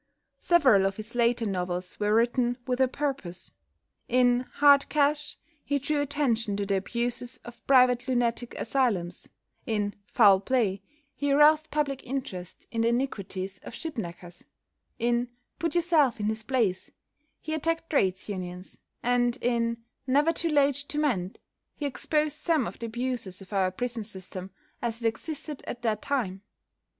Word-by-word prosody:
Several 260 - +5
of 195 - -4
his 215 +2 -7
later 235 -1 +2
novels 180 -2 -3
were 210 0 +2
written 240 +1 +2
"with 255 0 0
a 260 - +5
purpose." 260 -10 -3 0.6
In 245 0 +3
"Hard 285 -1 +5
Cash" 295 0 +1 0.3
he 285 - 0
drew 290 +2 0
attention 245 -8 0
to 200 - -1
the 195 0 +1
abuses 240 +4 -3
of 240 0 -11
private 250 -2 +5
lunatic 245 -1 0
asylums; 225 -9 -1 0.4
in 205 -3 0
"Foul 200 -4 +6
Play" 205 -3 0 0.3
he 285 -1 -1
aroused 305 +2 +5
public 280 -3 -1
interest 240 -9 -5
in 230 - -1
the 230 - +3
iniquities 200 -6 -2
of - - -10
ship 325 -2 -5
knackers; 175 -4 -7 0.5
in 240 +1 +1 0.3
"Put 335 +1 -1
Yourself 325 -8 +3
in 205 - -1
His 220 +1 -1
Place," 220 -6 0 0.5
he 315 - -5
attacked 330 +1 -1
Trades 190 -10 +1
Unions, 185 -2 -6 0.2
and 245 0 +2
in 235 -1 0 0.2
"Never 290 +5 +3
Too 335 +1 -1
Late 285 -2 +3
to 285 +1 -4
Mend" 220 -12 0 0.4
he 295 - -4
exposed 300 +2 -1
some 320 -7 +1
of - - -7
the 230 - -4
abuses 240 -5 -3
of 195 +1 -12
our 190 -2 +2
prison 235 +3 -4
system 190 -2 -8 0.3
as 230 -1 -2
it 230 - +1
existed 295 +5 -5
at 240 - -6
that 215 -2 0
time. 215 -10 -2
240 Hz, 155 wpm, -28 LUFS, 205-280 Hz, 0.6 s, Foul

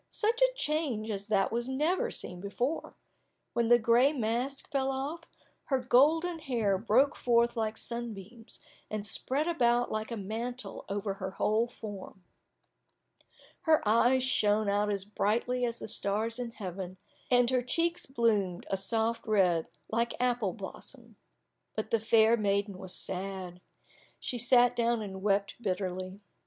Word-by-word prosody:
Such 460 +3 0
a - - +7
change 285 - -1
as 200 0 -4
that 200 -3 +2
was 235 +2 -2
never 340 - +1
seen 180 - -5
before! 240 +10 -3 0.6
When 235 -1 +1
the 240 +1 +7
gray 240 +4 +4
mask 250 +3 -2
fell 270 -2 +1
off, 285 +5 -4 0.4
her 270 - +1
golden 310 +7 +3
hair 230 - 0
broke 235 +6 +3
forth 235 -1 +2
like 220 -1 -2
sunbeams, 230 -1 -7 0.3
and 215 -1 -3
spread 275 +8 +1
about 245 -7 +2
like 215 0 -2
a 230 - -4
mantle 225 +2 -5
over 200 0 -2
her 190 - -2
whole 215 +4 +1
form. 205 -5 -9 1.4
Her 315 -8 +3
eyes 240 +4 +4
shone 215 -4 +2
out 205 +1 +1
as 195 -1 +1
brightly 235 +4 0
as 235 -1 -3
the - - -7
stars 220 +3 0
in 245 -1 -3
heaven, 190 -4 -7 0.3
and 245 0 +4
her 255 -1 +2
cheeks 335 +7 0
bloomed 215 -8 0
a 195 - +1
soft 225 +4 -1
red 180 -6 +2 0.2
like 235 +1 0
apple 245 -6 +1
blossom. 230 +3 -10 0.6
But 215 0 -4
the 230 - +3
fair 220 +1 +4
maiden 200 -2 -1
was 185 -1 -4
sad. 185 -1 -4 0.6
She 245 - -4
sat 245 +1 +4
down 235 -1 +1
and 190 -2 -7
wept 200 +2 0
bitterly. 185 -1 -3
230 Hz, 145 wpm, -30 LUFS, 200-250 Hz, 1.4 s, a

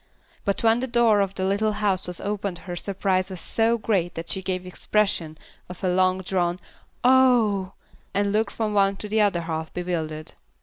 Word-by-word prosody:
But 200 +2 0
when 225 +1 +4
the 260 - -2
door 235 -4 +4
of 195 0 -1
the 190 - -1
little 205 +3 +1
house 205 -3 0
was 180 -1 -5
opened 200 -3 -3
her 175 -2 -5
surprise 190 0 -1
was 185 -2 -7
so 225 +6 +1
great 190 -6 0
that 165 0 -6
she 190 - -2
gave 185 -1 -3
expression 180 -4 -1 0.3
to 180 - -6
one 180 -1 +1
long 185 0 +2
drawn 175 -1 0 0.4
"Oh 240 -7 +4
h!" - - -31 0.2
and 200 0 +1
looked 215 +2 +1
from 215 -2 -2
one 195 -1 +3
to 210 - -7
the 215 +1 +2
other 200 -5 +2
half 160 -1 -4
bewildered. 160 -3 -3
195 Hz, 190 wpm, -24 LUFS, 180-210 Hz, 0.4 s, when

